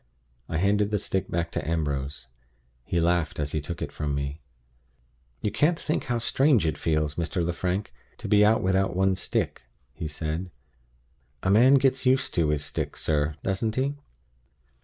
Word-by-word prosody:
I 80 - -1
handed 100 +3 +2
the 105 - +1
stick 95 -2 -2
back 85 0 -1
to - - -3
Ambrose. 70 -3 -2 0.6
He 85 - -1
laughed 85 -3 +1
as 75 -1 -1
he 80 - -1
took 85 +3 -5
it - - -5
from 75 -2 -2
me. 70 +2 -4 1.0
"You 105 - -1
can't 165 +3 +2
think 155 - -2
how 120 -1 0
strange 130 - +3
it 80 - 0
feels, 75 -2 0
Mr. 85 +1 -1
Lefrank, 90 +4 -2 0.2
to - - -7
be 105 0 +5
out 110 +2 +4
without 95 -1 +1
one's 95 0 +2
stick," - - -1 0.3
he 80 - -5
said. 80 +4 -3 0.9
"A 95 - +2
man 125 +7 +7
gets 130 -1 +2
used 130 +1 +2
to 80 -3 +2
his 75 -1 0
stick, - - -4
sir; 75 -1 0
doesn't 105 +3 -1
he? 135 +2 0
90 Hz, 170 wpm, -26 LUFS, 75-105 Hz, 1.0 s, man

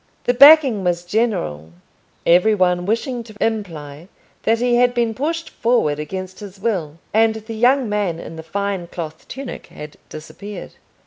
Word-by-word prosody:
The 245 - +2
backing 275 -5 +7
was 175 -1 -1
general, 130 - -1 0.5
every 180 +6 +5
one 180 -2 +1
wishing 235 +3 -1
to 220 -2 -14
imply 165 -8 -3 0.3
that 225 +1 +2
he 240 0 +2
had 245 0 +3
been 235 -2 +1
pushed 325 +7 -3
forward 230 -12 +1
against 185 +4 -6
his 200 -2 -10
will; 180 -8 -2 0.2
and 220 +1 +3
the 220 +1 -7
young 250 +3 +3
man 205 -5 -1
in 165 - -8
the 160 - -7
fine 195 +1 -3
cloth 160 -2 -7
tunic 270 0 -7
had 150 0 -11
disappeared. 200 +7 -9
205 Hz, 155 wpm, -20 LUFS, 170-235 Hz, 0.5 s, backing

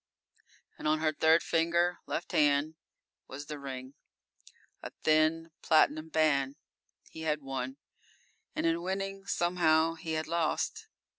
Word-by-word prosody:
And - - -3
on 155 +1 +3
her 155 -1 +1
third 160 +2 +4
finger, 170 +1 +1
left 175 - -4
hand, 145 +1 +3 0.5
was 140 +2 -8
the 150 0 -7
ring 130 -1 -7 0.9
a - - -6
thin, 155 +1 +2
platinum 155 0 +3
band. 145 -4 +2 0.6
He 160 - -9
had 150 -2 -1
won, 135 0 -4 0.8
and - - -1
in 165 +1 +1
winning 195 +2 -4
somehow 165 -3 +2
he 160 -1 -5
had 155 0 -1
lost. 165 -1 -1
160 Hz, 130 wpm, -30 LUFS, 150-165 Hz, 0.9 s, third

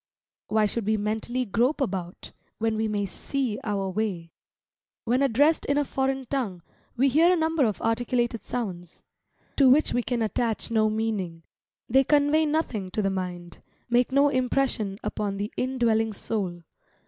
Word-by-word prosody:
Why 215 -1 +2
should 210 0 -2
we 215 0 +2
mentally 220 +4 -2
grope 245 +8 +1
about, 185 -9 -4 0.3
when 225 0 0
we 220 0 0
may 205 -1 -1
see 245 +3 -3
our 200 -3 -1
way? 185 -4 -3 0.7
When 245 +3 +1
addressed 280 +5 +3
in 285 - +1
a 290 - +2
foreign 265 0 -1
tongue, 225 -10 -3 0.3
we 265 +3 +4
hear 320 +6 +5
a - - +4
number 320 -3 +2
of 215 -3 -1
articulated 235 -1 0
sounds, 180 -9 -5 0.5
to 275 -3 +6
which 290 +5 +4
we 245 - +2
can 240 -1 -1
attach 225 +1 -1
no 215 -1 +3
meaning; 210 -7 -2 0.4
they 265 +3 +4
convey 295 +2 +3
nothing 255 - -1
to 210 +3 -2
the 195 - +1
mind, 180 -2 -5 0.3
make 245 +2 +3
no 280 +2 +4
impression 255 -6 0
upon 200 -2 -2
the 205 +2 -4
in 260 +1 -2
dwelling 225 -2 +2
soul. 190 -5 -3
225 Hz, 160 wpm, -26 LUFS, 205-265 Hz, 0.7 s, to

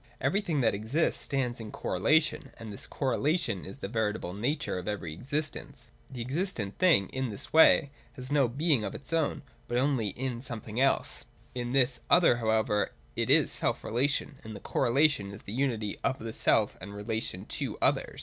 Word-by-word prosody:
Everything 185 -8 0
that 115 - +3
exists 110 +11 0
stands 125 -4 -1
in 110 -2 -7
correlation, 150 - +1
and 110 -2 -8
this - - -8
correlation 140 - 0
is 95 - -9
the 120 - -5
veritable 105 -4 -2
nature 120 0 -1
of 90 - -8
every 95 -7 -3
existence. 145 - -4 0.2
The 125 -3 -7
existent 130 - -1
thing 165 - +5
in 130 -1 -2
this 100 - -5
way 160 -2 +6 0.2
has 130 0 -7
no 140 -3 +4
being 140 0 +1
of 100 - -4
its 140 +4 -7
own, 160 -3 0 0.2
but 120 - -1
only 130 -4 +1
in 120 +3 -3
something 115 -3 -5
else: 135 - +1 0.3
in 120 -1 -3
this 130 -2 +2
other 170 -9 +6
however 110 -2 +1 0.2
it - - -1
is - - +5
self - - -1
relation; 135 +3 0
and 110 -3 -9
correlation 135 -4 +2
is 100 - -10
the 100 - -7
unity 115 -6 -1
of 135 -1 +1
the 110 0 -6
self 110 -2 +2
relation - - -7
and 100 - -9
relation 105 -2 -3
to - - -4
others. - - +1
120 Hz, 180 wpm, -29 LUFS, 105-140 Hz, 0.3 s, way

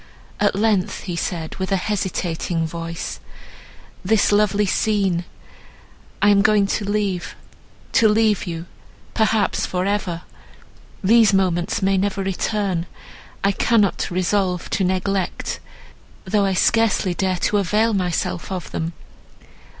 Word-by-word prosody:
At 205 -2 +2
length 205 -3 +1
he 180 -3 -5
said, 170 -2 -4
with 190 0 -3
a - - +4
hesitating 180 -4 -2
voice, 165 +1 -5 0.8
"This 210 +2 +3
lovely 210 0 +3
scene!—I 195 0 -2
am 200 -1 +5
going 210 -1 +4
to 200 +1 -2
leave—to 205 +2 -2
leave 210 -2 +2
you—perhaps 195 +5 -2
for 180 0 -1
ever! 190 -4 -2 0.8
These 220 0 +5
moments 180 -1 0
may 195 0 +3
never 200 0 -1
return; 190 -2 -1 0.6
I 200 - +4
cannot 210 -1 +1
resolve 185 0 0
to 195 - +1
neglect, 190 +1 -1 0.7
though 200 +1 +2
I 195 - +1
scarcely 220 -3 +2
dare 185 0 0
to 210 - +2
avail 210 +4 +2
myself 180 -1 -2
of 185 -3 -5
them. 165 +1 -3
195 Hz, 115 wpm, -21 LUFS, 180-210 Hz, 0.8 s, am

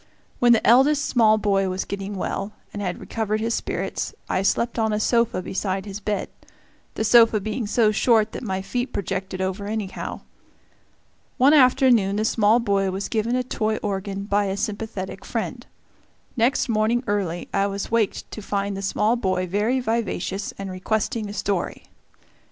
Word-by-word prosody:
When 240 -1 +5
the 230 - +4
eldest 280 +5 +5
small 220 -3 +4
boy 195 -2 +1
was 185 +1 -2
getting 200 0 -5
well, 195 +2 -3 0.2
and 205 - -5
had 180 -3 -3
recovered 215 -1 -2
his 230 +1 -1
spirits, - - -3
I - - 0
slept 235 +4 0
on 220 -1 +1
a 210 - 0
sofa 230 -4 +1
beside 190 +1 -2
his 200 0 -6
bed 205 -1 -2 0.7
the - - -1
sofa 225 -1 +6
being 215 +2 -3
so 220 0 +3
short 220 0 +3
that - - -6
my 190 -4 -3
feet 245 +5 -3
projected 190 0 -3
over 190 +2 -2
anyhow. 210 -3 -4 1.2
One 270 +4 +5
afternoon 250 -7 +5
the 215 +1 0
small 220 +1 +3
boy 200 -4 +1
was 190 +1 -4
given 230 +2 0
a 255 - +1
toy 220 -3 -1
organ 200 -1 -3
by 205 0 +1
a 195 0 -2
sympathetic 205 -2 -4
friend. - - -4 0.7
Next 245 +3 +2
morning 225 +2 +1
early 190 -4 -2
I 200 0 +2
was 200 +1 -4
waked 230 -3 0
to 215 - -7
find 200 0 -2
the 195 - -5
small 210 +3 +1
boy 185 -5 0
very 210 +8 0
vivacious 220 -4 -2
and 195 -1 -5
requesting 215 +3 -2
a - - -6
story. 195 -2 -2
210 Hz, 170 wpm, -23 LUFS, 195-230 Hz, 1.2 s, sofa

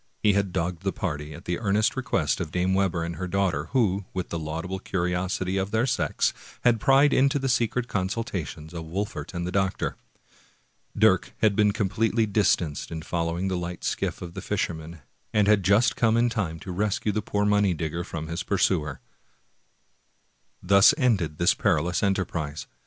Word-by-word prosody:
He 105 - +5
had 100 -1 0
dogged 90 -1 -2
the 95 0 -1
party, 75 -8 -4
at - - -12
the 90 -1 -2
earnest 105 0 +1
request 125 - 0
of 85 - -3
Dame 90 +3 0
Webber 95 -3 +1
and 85 -1 -4
her 90 +2 -3
daughter, 90 -6 0
who, 100 -6 +1
with 90 -2 -3
the 85 - -3
laudable 80 +5 -4
curiosity 90 +1 -1
of 95 0 -1
their 110 +3 +1
sex, - - 0 0.3
had 120 -2 +4
pried 135 +4 +5
into 135 +2 +3
the 135 -1 -1
secret 120 -1 +1
consultations 95 - -3
of 85 -1 -5
Wol 95 +6 -2
fert 100 - -8
and 85 0 -2
the 90 - -3
doctor. 95 0 -1 1.0
Dirk 100 -4 +3
had 105 -2 +4
been 105 -1 +4
completely 110 +2 +1
distanced 90 -7 +1
in 80 -1 -6
following 85 +2 -2
the 95 - -1
light 90 0 -6
skiff - - -2
of 85 -1 -8
the - - -6
fisherman, 80 0 -3 0.3
and 105 -1 +4
had 105 -1 +5
just 100 +6 +3
come 115 -1 +2
in 120 +1 +3
time 90 -9 -2
to 95 - -6
rescue 105 +3 0
the 105 +1 -1
poor 105 0 -1
money 105 -3 +3
digger 80 +2 -3
from 80 -2 -6
his 85 +3 -4
pursuer. 85 -7 0 1.6
Thus 100 +3 +6
ended 100 - +1
this 85 - +4
perilous 85 +1 +1
enterprise. 85 -7 -1
95 Hz, 180 wpm, -26 LUFS, 85-105 Hz, 1.6 s, Thus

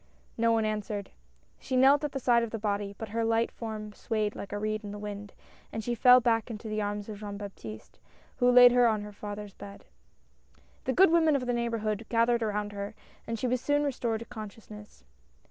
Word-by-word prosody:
No 230 0 +2
one 225 -1 +2
answered. 210 -2 -3 0.5
She 260 - -2
knelt 275 +3 +5
at 295 - -1
the 270 - -3
side 240 -2 +3
of 230 - -2
the 225 - -4
body; 205 -1 -2
but 225 - -6
her 230 +2 -1
light 225 +1 +1
form 215 -2 -6
swayed 215 -1 -2
like 200 - -7
a 205 - -2
reed 215 +1 -2
in 205 - -6
the 205 - -6
wind, 205 -1 -7 0.4
and 220 - -4
she 240 - -1
fell 250 +2 +7
back 230 -1 +1
into 225 0 -7
the 215 0 -2
arms 205 0 -3
of 210 -2 -7
Jean 205 -1 -6
Baptiste, 155 - -9 0.4
who 245 - +4
laid 245 0 +9
her 245 0 +5
on 215 -2 0
her 210 0 -9
father's 205 0 -7
bed. 200 +1 -11 1.0
The 260 - 0
good 375 +1 +6
women 320 -3 +4
of 260 -2 -1
the 245 - 0
neighborhood 230 -2 -2
gathered 235 0 +2
around 210 -1 -2
her, 200 +1 -6 0.3
and 230 - -2
she 240 - -3
was 250 0 0
soon 290 +1 +1
restored 240 -5 -1
to - - -6
conscious 220 -2 -10
ness. 210 - -12
220 Hz, 215 wpm, -29 LUFS, 205-240 Hz, 1.0 s, laid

